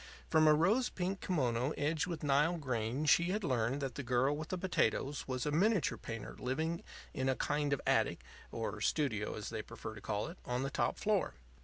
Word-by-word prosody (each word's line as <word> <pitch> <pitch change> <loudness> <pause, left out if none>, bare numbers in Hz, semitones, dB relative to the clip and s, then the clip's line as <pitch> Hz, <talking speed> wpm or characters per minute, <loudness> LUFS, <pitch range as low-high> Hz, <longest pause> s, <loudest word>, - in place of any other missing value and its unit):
From 155 -1 +5
a 155 - +8
rose 210 +11 +3
pink 185 +1 -3
kimono 130 -5 0
edged 150 +3 0
with 170 -4 -4
Nile 150 +4 +3
green 130 -1 -1
she 170 +3 +5
had 200 +4 -1
learned 130 -1 0
that 135 -2 -2
the 140 - -4
girl 130 +2 +2
with 155 +2 -6
the 185 - -2
potatoes 160 -6 0
was 130 -1 -2
a 150 - 0
miniature 190 +2 +2
painter 115 -1 -7
living 160 +6 -1 0.3
in 130 0 0
a 130 - +2
kind 145 +1 0
of 140 - +1
attic - - +2 0.3
or - - -4
"studio," 110 -8 0
as 105 0 -5
they 110 -2 -3
prefer 110 0 -8
to 105 - -10
call 105 0 -2
it 170 +3 -9
on 125 +1 -1
the 135 - -2
top - - 0
floor. - - +1
145 Hz, 205 wpm, -34 LUFS, 125-165 Hz, 0.3 s, a